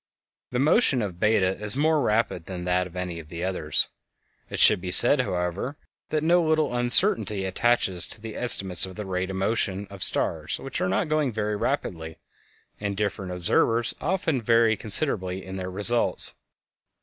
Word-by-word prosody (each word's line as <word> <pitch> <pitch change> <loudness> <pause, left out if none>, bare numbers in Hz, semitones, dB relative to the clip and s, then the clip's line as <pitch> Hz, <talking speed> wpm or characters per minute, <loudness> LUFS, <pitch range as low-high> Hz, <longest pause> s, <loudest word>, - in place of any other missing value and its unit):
The 125 - -4
motion 140 - +2
of 90 -4 -7
Beta 95 -3 +1
is 105 +4 +2
more 155 +1 +1
rapid 105 -7 -1
than 90 -2 -7
that 90 0 0
of 90 - -17
any 90 -2 -5
of 75 -2 -13
the 85 +1 -7
others. 80 -6 -1 0.6
It - - -6
should - - +5
be 90 - -6
said, 120 +9 +6
however, 90 - -4 0.3
that 155 -1 -2
no 175 +2 +3
little 155 -5 0
uncertainty 120 - +4
attaches 95 -3 0
to 110 - -8
the 110 0 -9
estimates 95 -7 +1
of 95 - -12
the 105 - -7
rate 95 0 -4
of 95 - -5
motion 100 0 -2
of 100 -2 -11
stars - - -1
which - - -6
are - - -1
not 95 - -1
going 155 -3 -1
very 105 -1 -3
rapidly, 85 - -4 0.6
and 100 -1 -4
different 100 -2 -4
observers 115 +6 +1
often 160 -5 -2
vary 115 0 +2
considerably 95 -5 -2
in 95 0 -8
their 95 0 -5
results. 105 +6 +5
100 Hz, 175 wpm, -24 LUFS, 90-120 Hz, 0.6 s, said